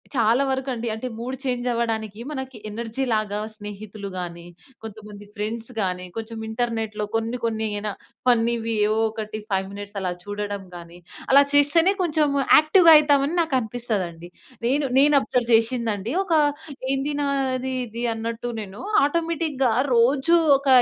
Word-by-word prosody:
చాలా 235 +3 +3
వరకండి. 260 -3 -2
అంటే, 220 +3 -4
mood 250 +3 -4
change 250 -1 -2
అవ్వడానికి 220 -3 -2
మనకి 265 -3 -6
ఎనర్జీ‌లాగా 220 -2 -2 0.2
స్నేహితులు 205 -1 -8
గాని, 170 -1 -6 0.4
కొంతమంది 210 -1 -10
ఫ్రెండ్స్ 220 +3 -4
గాని, 180 -1 -2
కొంచెం 225 0 -5
ఇంటర్నెట్‌లో 220 -2 -2
కొన్ని, 225 +2 -1
కొన్ని 220 -1 -1
యేన 210 +1 -3 0.4
ఫన్నీవి 230 -1 +2
ఏవో 215 +1 +1
ఒకటి 215 0 -6
5 190 0 0
మినిట్స్ 205 0 -8
అలా 185 -1 -1
చూడడం 205 0 -4
గానీ, 170 0 -11 0.3
అలా 280 - +8
చేస్తేనే 325 +6 +4
కొంచెము 300 -4 +1 0.2
యాక్టివ్‌గా 325 +2 +7
అయితామని 290 +1 +3
నాకనిపిస్తదండి. 220 - -2 0.4
నేను 280 +3 +1
నేను 290 +1 +5
అబ్జర్వ్ 245 -1 -1
చేసిందండి 225 -1 0
ఒక 355 - -2 0.6
ఏంది 275 +2 -1
నాది 265 -2 -1
ఇది 235 +2 -6
అన్నట్టు 230 +1 -4
నేను 195 0 -10 0.2
ఆటోమేటిక్‌గా 310 -5 0 0.2
రోజు 270 +8 +4 0.2
ఒక 275 - -8
230 Hz, 130 wpm, -23 LUFS, 210-270 Hz, 0.6 s, అలా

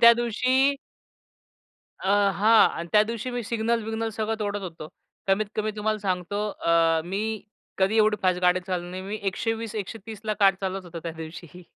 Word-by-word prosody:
त्या 235 0 +10
दिवशी 255 +4 +2 1.3
अ, 190 - -3 0.3
हां. 220 +5 +6
आणि 170 +1 -5
त्यादिवशी 220 +3 +2
मी 245 -1 -3
सिग्नल-बिग्नल 225 -1 -1
सगळं 220 0 -1
तोडत 205 0 -2
होतो. 165 -4 -7 0.4
कमीत-कमी 215 +2 0
तुम्हाला 215 +1 0
सांगतो 195 +1 -2
अ, 165 -3 +2
मी 195 +4 -2 0.6
कधी 195 +4 +2
एवढी 215 -1 +4
फास्ट 185 -1 +2
गाडी 180 0 +3
चालवणार 180 -2 -3
नाही. 185 +1 -6
मी 205 +3 -4
120, 225 +2 -2
130 215 +1 -6
ला 215 - 0
कार 195 -1 +6
चालवत 190 0 -3
होतो 170 -1 -8
त्या 165 -1 -4
दिवशी. 165 +2 -9
205 Hz, 160 wpm, -26 LUFS, 180-225 Hz, 1.3 s, त्या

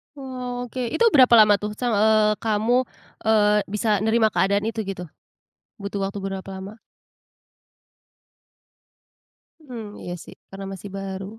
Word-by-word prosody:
Oke. 250 -2 -5
Itu 470 0 +4
berapa 255 -6 +6
lama 210 -2 +7
tuh 210 0 -5
sang 245 +2 -1
eee, 215 0 +4
kamu, 225 +2 +1 0.5
eee, 210 -1 +4
bisa 210 0 0
nerima 220 +1 +2
keadaan 195 +3 +1
itu 225 0 -3
gitu? 190 -2 -5 0.7
Butuh 200 -1 -5
waktu 200 - -8
berapa 195 0 -5
lama? 195 +3 -8 2.9
Mmm, 225 -5 -8
iya 175 - -5
sih, - - -13
karena 195 0 -8
masih 195 +1 -9
baru. 195 0 -5
210 Hz, 125 wpm, -23 LUFS, 195-235 Hz, 2.9 s, lama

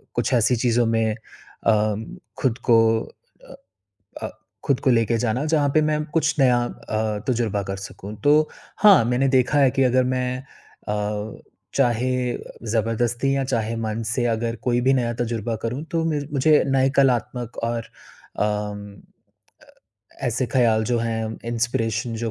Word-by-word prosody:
कुछ 120 +2 0
ऐसी 120 +1 +3
चीज़ों 120 0 +2
में 115 -1 +1 0.5
अम, 110 0 +2 0.3
खुद 125 -5 0
को 115 - +7 0.7
अ - - -10 0.7
अ, - - -3 0.3
खुद 140 -3 +1
को 130 - +2
लेके 115 -1 +2
जाना 120 +4 -1
जहाँ 150 -2 +2
पे 155 - +5
मैं 150 0 0
कुछ 155 -2 +2
नया 125 -2 +5
अ, 110 -2 -3
तजुर्बा 115 -5 0
कर 95 - -3
सकूँ। 100 +1 -8
तो 150 +1 +4 0.3
हाँ, 200 - +7
मैंने 125 +3 +1
देखा 130 +2 +3
है 135 -2 +5
कि 135 - +1
अगर 130 0 +3
मैं 125 0 -1 0.5
अ, 105 0 -3 0.3
चाहे 125 -1 +2 0.6
ज़बरदस्ती 120 +4 0
या 135 - +1
चाहे 115 -4 -1
मन 110 0 -3
से 120 +1 0
अगर 115 +1 -2
कोई 120 -1 +1
भी 130 +2 +3
नया 120 -2 0
तजुर्बा 115 -1 -2
करूँ 125 +5 -3
तो 165 -1 0
मेर 145 -2 -2
मुझे 150 +2 +4
नए 135 -1 +2
कलात्मक 125 -2 +1
और 115 0 -2 0.6
अम, 105 -1 -2 0.7
अ, - - -20 0.6
ऐसे 125 +2 0
ख्याल 115 -4 +3
जो 120 +2 0
हैं, 115 -1 -1 0.2
इंस्पिरेशन 115 0 -1
जो 115 - -1
120 Hz, 155 wpm, -23 LUFS, 110-130 Hz, 0.7 s, को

